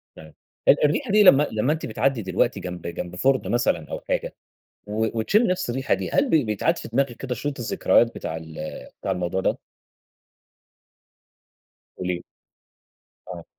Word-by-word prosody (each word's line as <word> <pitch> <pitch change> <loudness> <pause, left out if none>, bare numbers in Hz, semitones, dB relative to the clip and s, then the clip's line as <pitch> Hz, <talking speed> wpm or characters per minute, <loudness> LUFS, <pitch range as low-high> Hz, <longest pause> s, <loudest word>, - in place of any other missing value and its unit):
طيب، 80 0 -13 0.3
ال 145 - +6
الريحة 170 - 0
دي 210 +1 +6
لمّا 150 -6 +7
لمّا 110 +7 +1
أنتِ 160 - -5
بتعدي 130 +1 0
دلوقتي 95 -2 0
جنب 90 -2 -6
جنب 85 +1 -5
فُرن 130 +6 +1
مثلًا 120 -9 0
أو - - -3
حاجة، - - -1 0.5
و 110 +2 -1
وتشمّي 210 - +3
نَفس 180 -8 -1
الريحة 130 +3 0
دي، - - -4
هل 280 -2 +2
بي 155 -4 +4
بيتعاد 105 -3 0
في - - -7
دماغِك 135 +2 0
كده 130 -2 -4
شريط 140 +4 -4
الذكريات 115 0 +2
بتاع 80 - -5
ال 80 -1 -10 0.4
بتاع - - -3
الموضوع 90 +1 -2
ده؟ - - 0 2.4
قولي 90 -1 -2
لي. 85 - -6 1.0
آه. 85 -2 -8
115 Hz, 160 wpm, -24 LUFS, 90-140 Hz, 2.4 s, لمّا